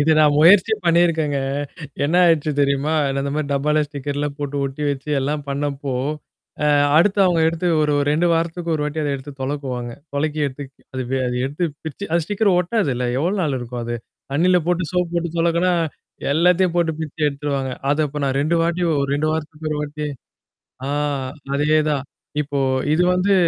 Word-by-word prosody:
இத 150 +2 +3
நான் 150 -1 +5
முயற்சி 185 +7 +6
பண்ணியிருக்கேங்க. 165 -4 +2 0.7
என்ன 160 +5 +1
ஆயிடுச்சு 160 -3 +3
தெரியுமா? 140 +2 +1 0.2
நான் - - -1
அந்தமாரி 140 +2 -2
டப்பால 150 +2 +2
ஸ்டிக்கர்லாம் 145 0 -4
போட்டு 145 -1 -3
ஒட்டி 135 +2 -4
வச்சு 140 +2 -5
எல்லாம் 145 +2 -2
பண்ணப்போ 140 -1 -2 0.7
அ - - +3 0.3
அடுத்து 195 +5 +4
அவுங்க 175 -3 +3
எடுத்து 165 +2 -1
ஒரு 150 -1 +2
2 155 +4 +2
வாரத்துக்கு 165 +1 -1
ஒரு 150 - -1
வாட்டி 150 +1 -2
அத 150 - -1
எடுத்து 135 +2 -9
தொலக்குவாங்க. 130 -3 -3 0.2
தொலைக்கி 150 +2 -1
எடுத்து 140 +1 -6 0.3
அது, 130 - -2 0.2
அது 125 - -2
எடுத்து 145 +6 -2 0.2
பிரிச்சு 160 +5 -6
அது 170 0 +3
ஸ்டிக்கர் 205 +3 +1
ஒட்டாதுல்ல 175 - 0
எவ்வளோ 175 +7 +1
நாள் 145 -5 0
இருக்கும் 120 0 -6
அது. 120 +1 -3 0.4
தண்ணீல 180 +5 +4
போட்டு 180 0 +1
சோப்பு 180 -1 0
போட்டு 170 0 0
தொலக்குனா, 170 +2 +2 0.6
எல்லாத்தையும் 180 +3 +3
போட்டு 170 -2 +2
பிரிச்சு 160 0 -6
எடுத்துருவாங்க. 140 -2 -2 0.2
அத 145 - +1
அப்ப 150 +1 -5
நான் 135 -1 0
2 155 +4 +1
வாட்டி 170 +1 0 0.2
ஒரு 140 - -1
2 150 +2 0
வாரத்துக்கு 155 0 -4
ஒரு 150 - -1
வாட்டி. 150 0 -4 0.8
ஆ - - -3 0.7
அதேதான். 150 -1 +2 0.4
இப்போ 145 -1 -3 0.3
இது 170 +3 +3
வந்து 185 +2 +2
150 Hz, 165 wpm, -21 LUFS, 140-170 Hz, 0.8 s, முயற்சி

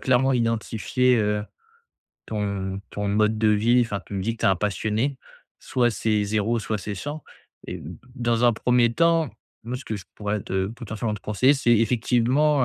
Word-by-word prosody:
clairement 130 +1 +3
identifié, 115 +1 +1
heu, 105 -1 0 0.8
ton 100 -2 -3
ton 105 0 -3
mode 105 +2 +2
de 110 -1 +3
vie, 115 +4 +4
enfin 105 -4 -3
tu 100 - -8
me 95 - -1
dis 115 +4 0
que - - -22
tu - - +2
es - - +6
un 95 - +3
passionné- 110 +7 -1 0.4
soit 120 -2 +1
c'est 105 -1 0
0 110 +3 0
soit 110 0 -2
c'est 100 0 -5
100- 145 +8 -5 0.5
et - - -4
d 75 - -9 0.3
dans 120 -1 +1
un 120 - +6
1er 120 +1 +2
temps, 165 -1 +2 0.3
moi 125 +2 -4
ce 130 - -10
que 110 - -4
je 100 -3 -7
pourrais 105 0 -2
te 95 0 -1
potentiellement 110 0 -4
te 100 - -8
conseiller, 130 +7 +3
c'est 120 -4 +3
effectivement, 125 +5 +2
115 Hz, 190 wpm, -24 LUFS, 105-125 Hz, 0.8 s, es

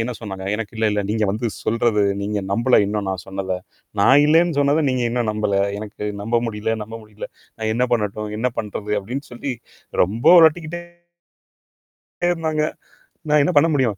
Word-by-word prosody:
என்ன 125 +2 -3
சொன்னாங்க, 95 -4 -7
"எனக்கு 110 0 -5
இல்லல்ல 105 -2 +1
நீங்க 110 0 +1
வந்து 110 +4 -2 0.2
சொல்றது 115 -2 +1 0.2
நீங்க 105 +1 -2
நம்பல. 120 +5 +4
இன்னும் 105 -1 -2
நான் 95 -3 -4
சொன்னத. 95 -1 -3 0.4
நான் 135 +7 +6
இல்லேன்னு 165 +1 +3
சொன்னத, 145 +2 +3
நீங்க 130 -1 0
இன்னும் 120 -2 0
நம்பல. 105 -2 0 0.2
எனக்கு 105 0 -8 0.2
நம்ப 115 +3 +1
முடியல 110 0 -2
நம்ப 110 +2 -10
முடியல. 105 -1 -9 0.3
நான் 110 -1 -2
என்ன 125 +2 +2
பண்ணட்டும்? 105 -2 -1
என்ன 125 +3 0
பண்றது?" 105 0 -4
அப்படின்னு 125 +8 -6
சொல்லி 130 +3 -4 0.5
ரொம்ப 105 +6 -2
ஒழட்டிக்கிட்டே 165 +1 +3 1.5
இருந்தாங்க. 160 -3 0 0.7
நான் 150 0 +4
என்ன 160 - +1
பண்ண 145 - +6
முடியும்? 125 -8 +1
115 Hz, 160 wpm, -21 LUFS, 105-140 Hz, 1.5 s, நான்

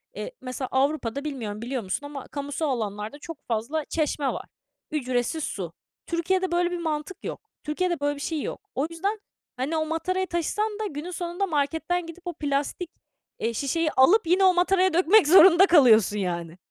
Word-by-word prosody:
Eee, - - -5
mesela, 255 +1 -4
Avrupa'da, 275 -1 0
bilmiyorum 225 -8 -4
biliyor 245 0 -3
musun 195 +9 -3
ama, 285 -2 -7
kamusal 285 +2 -3
alanlarda 215 +1 -3
çok 310 -1 -10
fazla 245 +7 -2
çeşme 300 -3 -1
var. - - -6 0.5
Ücretsiz 255 +1 -1
su. 180 - -4 0.3
Türkiye'de 360 +2 0
böyle 350 0 +1
bir 355 - -2
mantık 315 +1 -4
yok. 445 - -7
Türkiye'de 345 +2 -1
böyle 290 0 0
bir 285 - -9
şey 315 0 -2
yok. - - -6
O 275 +4 0
yüzden, 390 +6 -2 0.4
hani, 280 +6 -1
o 315 - 0
matarayı 370 +4 -1
taşısan 415 +6 -1
da 435 - -2
günün 305 +1 -6
sonunda 350 +2 -2
marketten 325 +2 -1
gidip 335 +2 -11
o 350 - -2
plastik, 295 +4 -2 0.5
eee, 230 - -1
şişeyi 305 +6 0
alıp 340 +10 +5
yine 365 +3 +4
o 375 -1 +6
mataraya 370 +1 +3
dökmek 365 +2 +5
zorunda 365 +2 +8
kalıyorsun, 230 - +5
yani. 170 -3 -3
310 Hz, 170 wpm, -25 LUFS, 265-355 Hz, 0.5 s, zorunda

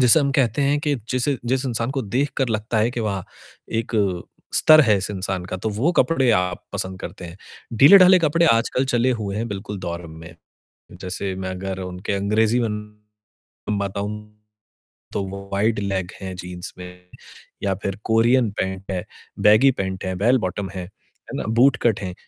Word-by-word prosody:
जैसे 125 +5 +6
हम 140 -1 +1
कहते 125 +2 +2
हैं 145 +1 +2
कि 145 -2 0 0.2
जिसे 130 +2 0
जिस 130 +2 0
इंसान 115 0 -1
को - - -1
देखकर 135 +4 -1
लगता 110 +1 -1
है 115 +3 +2
कि 120 - -4
वाह! 100 -4 -2 0.5
एक 115 +1 -2 0.6
स्तर 155 0 +7
है 110 -6 +4
इस 95 - -3
इंसान 95 -2 -3
का, 95 - -5
तो 110 - -3
वो 130 +12 0
कपड़े 135 -8 +3
आप 90 -3 0
पसंद 95 0 -3
करते - - -8
हैं। 85 +2 -9 0.4
ढीले-ढाले 185 +4 +8
कपड़े 165 +1 +2
आजकल 120 +3 0
चले 125 0 +2
हुए 100 -1 -3
हैं, 115 +2 -2
बिल्कुल 100 0 -6
दौर 85 -1 -5
में। 80 +1 -11 0.6
जैसे 95 +1 -4
मैं 95 0 -4
अगर 95 0 -5
उनके 90 +2 -5
अंग्रेजी 110 +4 +1
में 115 -2 0 1.1
बताऊँ 100 +1 -3
हूँ 105 0 -9 0.8
तो - - -1
वो 100 +1 -8
वाइड 105 +3 +1
लेग 95 -3 -2
हैं 95 -1 -5
जीन्स 90 -1 -7
में 90 0 -12 0.5
या 100 -1 +1
फ़िर 100 0 -2
कोरियन 115 +2 +3
पैंट 95 +1 -3
है, 90 -2 -3 0.3
बैगी 110 +6 +6
पैंट 95 -5 -4
है, 95 0 -2
बैल-बॉटम 100 -3 0
है। 95 -1 -6
है 90 +3 -14
ना? - - -3
बूट-कट 120 -1 +3
हैं। 90 -2 -4
105 Hz, 175 wpm, -22 LUFS, 95-125 Hz, 1.1 s, ढीले-ढाले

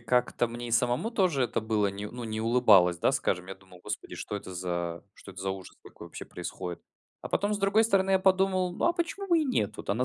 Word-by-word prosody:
как-то 120 0 +1
мне 120 +1 -6
и - - -6
самому 125 - +1
тоже 185 - +2
это 120 - -1
было, 110 -2 +1
не 100 +1 -4
ну 120 +2 -7
не 110 0 -3
улыбалось, 110 -7 +5
да, 135 - +2
скажем. 90 -9 -1
Я 95 - -6
думал: 95 -2 -18
"Господи, 105 0 -5
что - - -5
это 95 - -8
за 85 -2 -3
что - - -13
это 95 -1 -10
за 95 0 -1
ужас 95 -1 -8
такой - - -12
вообще - - -8
происходит." 90 0 -6 0.4
А - - -7
потом, 205 +1 0
с - - -3
другой 200 +2 +3
стороны, 195 -3 +2
я 190 - +5
подумал: 185 -1 +2
"Ну - - -2
а 340 - +4
почему 345 +3 -3
бы 340 -2 +5
и 315 - +1
нет? 250 - 0
Вот - - -5
она 115 +5 +1
115 Hz, 245 wpm, -28 LUFS, -, 0.4 s, улыбалось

